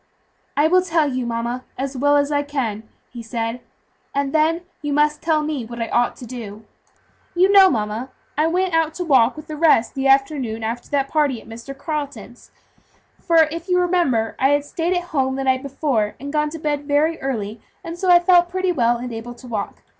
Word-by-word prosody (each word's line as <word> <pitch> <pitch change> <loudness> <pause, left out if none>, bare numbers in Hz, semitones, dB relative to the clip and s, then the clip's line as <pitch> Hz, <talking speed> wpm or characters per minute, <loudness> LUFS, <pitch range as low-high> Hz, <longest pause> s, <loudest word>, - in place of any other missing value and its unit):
"I 295 +2 +4
will 365 +3 +4
tell 330 -5 +1
you, 255 -1 -2
mama, 235 +2 -3
as 270 +1 -3
well 285 +3 +3
as 285 +1 +1
I 290 -1 +2
can," 235 -7 -4 0.2
he 240 - -8
said, 230 +1 -4 0.5
"and 280 -1 -1
then 320 +2 +2 0.2
you 295 -1 -2
must 300 +1 +2
tell 315 -2 +1
me 300 -4 -3
what 235 +1 -8
I 230 - -2
ought 240 0 +1
to 245 - -10
do. 220 -3 -8 0.7
You 370 +3 +4
know, 390 -1 +8
mamma, 220 +1 -2 0.3
I 305 +2 +2
went 360 +1 0
out 320 -1 +1
to 360 - -3
walk 260 -6 +4
with 305 - -8
the 310 - -7
rest 300 -7 +3
the 270 0 -1
afternoon 270 -5 +1
after 230 +2 -4
that 275 -1 0
party 290 -6 +1
at - - -17
Mr. 235 +5 -9
Carleton's; 295 -1 -6 0.7
for 330 -2 +5
if 335 +2 -7
you 360 - +3
remember, 340 -11 +1
I 265 - +3
had 290 0 +2
stayed 335 +4 -1
at 355 - -2
home 265 -2 +1
the 270 - -2
night 260 -1 +1
before, 275 -6 -1
and 280 +3 -7
gone 300 0 +1
to 325 - -7
bed 295 -2 -2
very 305 +3 +1
early, 220 -5 -4 0.2
and 335 - -6
so 365 +1 -2
I 350 - +9
felt 350 0 +4
pretty 370 0 0
well 240 -7 +2
and 245 0 -6
able 235 +2 -7
to 250 - -13
walk. 215 -4 -5
280 Hz, 210 wpm, -21 LUFS, 240-320 Hz, 0.7 s, I